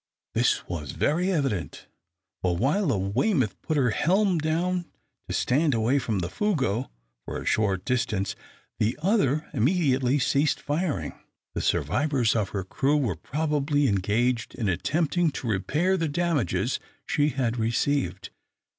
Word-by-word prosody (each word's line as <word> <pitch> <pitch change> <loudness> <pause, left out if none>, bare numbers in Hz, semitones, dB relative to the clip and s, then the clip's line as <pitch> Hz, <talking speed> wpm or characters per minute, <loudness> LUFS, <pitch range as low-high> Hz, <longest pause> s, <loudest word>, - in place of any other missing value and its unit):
This - - +1
was 75 -5 -5
very 175 +6 +1
evident, 135 - -2 0.6
for 90 -2 +1
while 155 - +1
the 130 -8 +2
"Weymouth" 110 - 0
put 155 - -1
her 125 -5 +3
helm 185 - +2
down, 175 +3 0 0.4
to - - -4
stand 145 +1 +2
away 115 +5 +2
from 110 -5 -2
the 85 -2 -1
"Fougueux" 130 - -1 0.3
for - - -5
a - - -8
short 100 -3 +1
distance, 115 -6 -1 0.4
the 110 +3 +1
other 160 - +2
immediately 135 - +2
ceased 140 +2 +2
firing. 145 - -2 0.4
The - - -2
survivors 125 - +1
of 105 -4 0
her 100 -2 -3
crew 135 +10 +1
were 120 - 0
probably 145 - 0
engaged 115 +5 0
in 110 - -2
attempting 160 - +1
to 125 - -5
repair 150 - +1
the 165 -3 -1
damages 155 - 0 0.3
she 145 0 +2
had 125 -4 -1
received. 115 -4 0
135 Hz, 140 wpm, -26 LUFS, 105-155 Hz, 0.6 s, her